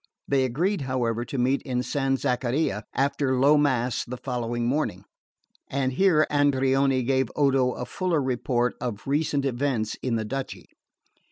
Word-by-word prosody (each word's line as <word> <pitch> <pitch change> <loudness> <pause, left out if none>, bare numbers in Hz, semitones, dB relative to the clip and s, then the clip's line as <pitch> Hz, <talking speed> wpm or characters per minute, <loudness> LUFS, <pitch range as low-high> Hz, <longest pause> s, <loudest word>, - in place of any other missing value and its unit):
They 135 -2 +2
agreed, 165 - 0
however, 120 -3 -1
to 135 - -5
meet 130 +3 +1
in 125 -3 -2
San 135 0 0
Zaccaria 125 -3 -1
after 135 -1 +1
low 140 +3 +5
mass 130 -5 +1
the 125 - -6
next 120 -2 -2
morning, 135 +6 -1 0.6
and 130 -1 -1
here 160 -1 +4
Andreoni 135 -2 +2
gave 130 -1 +1
Odo 135 -3 +2
a 125 - -5
fuller 180 0 -1
report 125 -2 0
of 115 -4 -4
recent 145 0 0
events 125 -4 -1
in 125 -3 -1
the 110 -1 -2
duchy. 135 +4 -5
130 Hz, 150 wpm, -25 LUFS, 125-140 Hz, 0.6 s, low